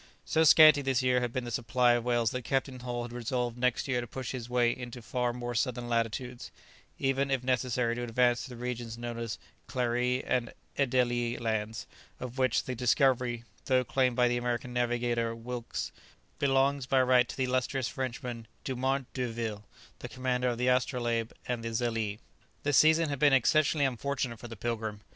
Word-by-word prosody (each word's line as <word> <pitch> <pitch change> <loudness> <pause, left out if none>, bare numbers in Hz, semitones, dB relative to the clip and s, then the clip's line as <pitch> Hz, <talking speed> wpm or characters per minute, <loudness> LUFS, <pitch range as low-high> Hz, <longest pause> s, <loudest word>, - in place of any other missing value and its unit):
So 160 - +2
scanty 155 -2 +8
this 130 -2 +1
year 125 -1 +3
had 120 -1 -1
been 130 +1 -2
the 120 - -6
supply 120 +2 +2
of 120 -1 +2
whales 120 -2 +1
that 125 - -3
Captain 135 +1 -1
Hull 120 -1 -4
had 120 0 -7
resolved 120 0 -2
next 125 +1 0
year 125 -2 0
to 120 - -7
push 130 +1 -5
his 125 -2 -6
way 120 -1 +2
into 125 -1 -7
far 120 +1 -1
more 120 0 -5
southern 120 0 -1
latitudes; 120 +2 -2 0.5
even, 135 +1 0
if 135 -2 0
necessary, 125 -2 +1
to 120 - -4
advance 120 0 +2
to - - -8
the 125 - -8
regions 120 -1 -5
known 120 0 -5
as 115 -3 -4 0.3
Clarie 125 +1 0
and 120 -2 -1 0.2
Adélie 120 -3 +1
Lands, 110 -1 -2 0.3
of 125 +1 -6
which 130 -2 +2
the 130 - -4
discovery, 125 -1 +2 0.2
though 130 -1 +3
claimed 125 0 +1
by 125 0 +4
the 120 0 +1
American 120 0 -2
navigator 120 -1 0
Wilkes, 120 +1 -5 0.5
belongs 135 -1 +2
by 135 - +3
right 125 -1 +4
to - - -7
the 130 - +1
illustrious 130 0 0
Frenchman 125 -3 -5 0.2
Dumont 130 +1 -1
d'Urville, 115 -4 -3 0.3
the - - -7
commander 125 -1 -1
of 120 -1 0
the 125 +1 0
"Astrolabe" 120 -3 +1 0.2
and 120 -2 -2
the 115 - -2
"Zélee." 115 -2 -1 0.5
The 145 - 0
season 160 +3 +5
had 140 -2 -3
been 145 -2 +5
exceptionally 145 +3 +3
unfortunate 130 -2 -2
for 120 - -8
the 115 - -8
"Pilgrim." 110 -2 -3
125 Hz, 185 wpm, -30 LUFS, 120-130 Hz, 0.5 s, scanty